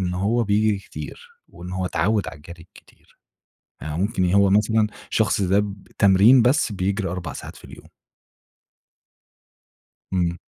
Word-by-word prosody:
إن 90 -1 -2
هو 110 +6 0
بيجري 105 0 +1
كتير 480 - -10 0.2
وإن 90 +1 -10
هو 95 0 -2
اتعوّد 105 +1 0
على 80 - -10
الجري 80 +3 -13
الكتير - - -22 0.6
فممكن، 90 +5 -2
يا 90 +2 +1
هو 100 -1 +4
مثلًا 105 +2 +2 0.2
شخص 105 -2 +1
ده 95 +1 +2
بتمرين 100 +3 +3
بس 125 -1 +2
بيجري 100 +1 -2
4 90 -2 -5
ساعات - - -9
في - - -14
اليوم. - - -14 2.3
إمم. 85 -2 0
100 Hz, 135 wpm, -22 LUFS, 90-105 Hz, 2.3 s, هو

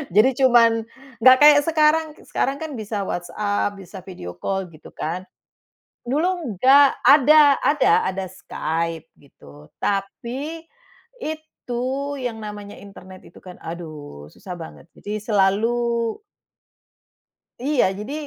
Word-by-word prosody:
jadi 220 +5 +6 0.2
cuman 230 -2 +4 0.4
nggak 255 +1 +8
kayak 295 -1 +8
sekarang. 315 0 +3
K - - -20
sekarang 275 +2 -1
kan 300 -6 -6
bisa 210 -1 -4
WhatsApp, 205 +3 -2
bisa 190 +1 -11
video 90 - -9
call, 190 - -3
gitu 155 - -15
kan. 175 +4 -5 0.8
Dulu 310 - -1
nggak. 275 +5 +5
Ada 290 0 +6
ada 295 -2 +2 0.2
ada 190 0 -3
Skype, 165 -2 -4
gitu. 75 - -17 0.2
Tapi, 250 +11 -3 0.6
itu 310 -6 -6 0.4
yang 240 -3 -4
namanya 205 -1 -8
internet 190 -2 -13
itu - - -16
kan, 180 -1 -11
aduh, 155 - -9
susah 180 -2 -9
banget. 165 -1 -11
Jadi 210 +1 -6
selalu 210 +2 +1 1.8
Iya, 260 -7 +1
jadi, 225 +7 -6
210 Hz, 120 wpm, -22 LUFS, 185-275 Hz, 1.8 s, nggak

